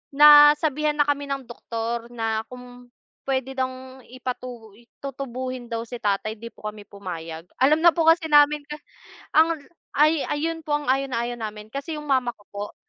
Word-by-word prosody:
nasabihan 295 0 +7
na 295 - +4
kami 285 0 -1
ng 275 -1 -3
doktor 235 0 -4
na, 225 -1 -1
kung 250 0 -12 0.4
puwede 265 -1 -1
bang 260 0 -4
ipatu 250 -3 -7 0.3
tutubuhin 255 -2 -5
daw 230 -1 -3
si 240 +1 -8
tatay, 210 +1 -1
'di 230 - -7
po 215 - -7
kami 210 -1 -12
pumayag. 165 -5 -7 0.2
Alam 295 +4 +4
na 340 - +8
po 330 -1 0
kasi 325 0 +5
namin 295 0 +5
ka 300 - -5 0.6
ang 325 +1 +5 0.4
ay 305 +1 +3
ayon 325 +2 -2
po 295 - 0
ang 295 0 -2
ayaw 270 +1 +2
na 235 - -1
ayaw 240 0 -3
namin, 215 -1 -7
kasi 280 +5 -5
yung 300 - -8
mama 260 -3 +2
ko 205 - -20
po. 205 0 -6
260 Hz, 175 wpm, -24 LUFS, 230-295 Hz, 0.6 s, na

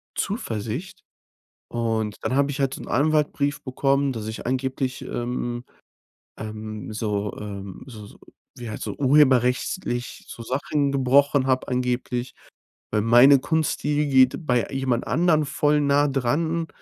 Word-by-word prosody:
Zuversicht. 120 - -4 0.7
Und 110 -4 -2
dann 130 - -1
habe 140 +1 +2
ich 140 0 -4
halt 135 -1 +1
so - - -8
'n - - -9
Anwaltbrief 145 -1 +1
bekommen, 135 +1 +1
dass 110 -2 -6
ich 110 +1 -6
angeblich, 130 0 -2
ähm, 120 0 -4 0.7
ähm, 110 0 -7
so, 105 -1 -2
ähm 100 -2 -7
so 110 -6 -10
so - - -16 0.4
wie 120 -2 -7
halt - - -6
so 105 - -4
urheberrechtlich 130 -1 +2
so 115 - -9
Sachen 140 +3 -1
gebrochen 135 +1 +3
habe 130 -1 0
angeblich. 125 0 -2 0.6
Weil 105 - +2
meine 120 +5 +7
Kunst, 160 +1 -1
die 150 0 0
geht 130 +3 +3
bei 125 -2 +2
jemand 130 -3 -1
anderen 160 -2 +2
voll 150 +1 +1
nah 145 0 +3
dran 160 +6 0
130 Hz, 140 wpm, -24 LUFS, 115-145 Hz, 0.7 s, meine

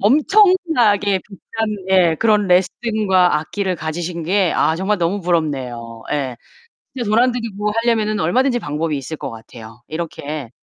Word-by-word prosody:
엄청나게 275 - +3
비싼 195 0 -15 0.5
예, 175 -4 +4
그런 210 -3 +3
레슨과 190 -1 +2
악기를 190 +3 -3
가지신 170 +2 -4
게 185 +2 +1
아 160 - +2
정말 200 +3 0
너무 180 +4 0
부럽네요. 130 -9 -2
예. 135 -4 -2 0.6
진짜 240 -5 -3
돈 215 - +3
안 250 +1 +4
들이고 210 -4 -3
하려면은 215 -2 +1
얼마든지 245 +9 +2
방법이 150 -2 -2
있을 145 +3 -6
것 - - -5
같아요. 115 0 -12
이렇게 155 -5 -5
185 Hz, 315 characters per minute, -19 LUFS, 155-215 Hz, 0.6 s, 예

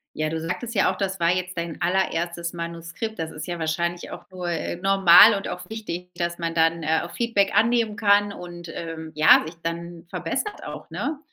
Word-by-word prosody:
Ja, 155 0 -1
du 160 0 -3
sagtest 185 +9 -4
ja 195 - +3
auch, - - -9
das 190 -2 -3
war 170 0 +3
jetzt 180 0 -2
dein 170 -2 -4
allererstes 170 -2 -1
Manuskript. 170 +5 -6
Das 160 0 -3
ist 155 0 -7
ja 175 -1 -4
wahrscheinlich 170 +2 -2
auch - - -10
nur, 180 -1 -5
äh, 170 0 -2
normal 195 +2 +7
und 195 - -5
auch 180 0 -6
wichtig, 180 -5 -6
dass 170 0 -2
man 165 -1 -2
dann, 165 0 +2
äh, 160 +1 +1
auch - - -9
Feedback 225 -5 +1
annehmen 225 0 +3
kann 205 -1 +3
und, 175 -2 -9
ähm, 160 -1 -6
ja, 155 - +7
sich 165 - -8
dann 170 +1 -5
verbessert 420 -1 -3
auch, - - -8
ne? 295 0 -3
175 Hz, 200 wpm, -24 LUFS, 165-195 Hz, -, normal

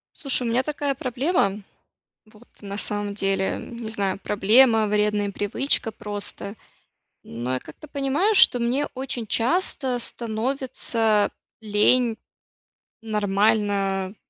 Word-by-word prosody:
Слушай, 275 -4 +1
у 235 - -1
меня 240 +2 +3
такая 290 0 -2
проблема, 255 - 0 0.7
вот, 215 +2 -20 0.2
на 200 0 -6
самом 205 -1 -1
деле, 195 -1 0
м, 235 - -9
не 230 -2 -6
знаю, 195 -3 -2
проблема, 220 +2 +4
вредная 210 -1 0
привычка, 225 +4 -1
просто, 205 -1 -6 0.7
но, 120 +2 -4
я - - 0
как-то 150 - -13
понимаю, 290 +9 0
что 380 -10 +6
мне 250 +5 0
очень 250 -4 -5
часто 260 -1 0
становится 230 -2 0 0.3
лень 220 +3 +3 0.9
нормально 205 -2 0
220 Hz, 115 wpm, -24 LUFS, 205-255 Hz, 0.9 s, что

